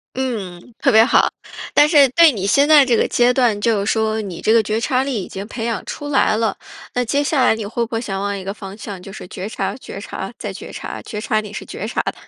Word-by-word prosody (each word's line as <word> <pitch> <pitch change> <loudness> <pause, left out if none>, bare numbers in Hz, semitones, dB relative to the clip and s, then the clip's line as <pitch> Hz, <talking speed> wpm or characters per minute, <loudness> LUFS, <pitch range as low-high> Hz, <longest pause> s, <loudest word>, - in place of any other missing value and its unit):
嗯， 225 -5 -5
特 275 - +3
别 220 -2 +7
好。 250 - +4 0.4
但 295 +1 +5
是 290 -4 +6
对 330 +2 +6
你 200 -6 -4
现 280 +7 +3
在 300 -3 +8
这 240 -3 +2
个 - - +2
阶 245 +1 +3
段， 240 -5 +2
就 210 -3 +1
是 - - +2
说 220 0 0
你 190 -5 -6
这 220 - +2
个 230 - +6
觉 215 +2 -1
察 255 +2 +1
力 255 -8 -2
已 - - -8
经 195 +2 -7
培 225 0 -6
养 230 -3 -2
出 290 - -6
来 265 -6 +2
了， 225 -2 0 0.4
那 250 - +1
接 285 +5 0
下 285 -3 +2
来 250 - +4
你 220 -1 -5
会 235 +3 -2
不 - - -25
会 225 - 0
想 195 -5 -4
往 200 0 -2
一 195 - -6
个 195 +1 -4
方 195 -1 -9
向， 205 -3 -8
就 195 +2 -10
是 195 - -9
觉 190 +3 -6
察、 - - -3
觉 - - -9
察、 - - -6
再 - - -5
觉 - - -9
察， - - -6
觉 210 - -6
察 215 0 0
你 210 -1 -9
是 - - -6
觉 - - -6
察 - - -1
的。 - - -3
225 Hz, 295 characters per minute, -19 LUFS, 205-255 Hz, 0.4 s, 在